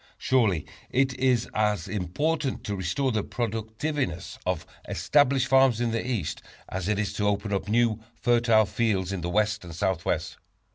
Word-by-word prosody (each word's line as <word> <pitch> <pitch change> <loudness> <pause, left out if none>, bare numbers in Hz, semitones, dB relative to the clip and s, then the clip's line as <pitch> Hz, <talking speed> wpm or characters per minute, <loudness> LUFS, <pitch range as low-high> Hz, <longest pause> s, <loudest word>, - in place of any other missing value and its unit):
Surely 110 - +2 0.2
it 130 +1 +2
is 125 -3 +2
as 105 -2 +1
important 130 - -1
to 105 - -3
restore 95 +9 0
the 110 -2 0
productiveness 110 - -3
of 90 -4 -1 0.2
established 140 -3 +3
farms 130 -3 +4
in 120 -1 0
the 115 - -1
East, 110 -12 -2 0.3
as 95 -1 -4
it 105 -1 +1
is 105 -1 -1
to 105 - 0
open 100 0 0
up 100 - -1
new, 115 -1 +2 0.2
fertile 115 -2 +4
fields 100 -4 0
in 95 -3 -3
the 85 - -2
West 105 +2 +1
and 85 -2 -9
Southwest. 95 -1 -1
110 Hz, 160 wpm, -27 LUFS, 95-125 Hz, 0.3 s, farms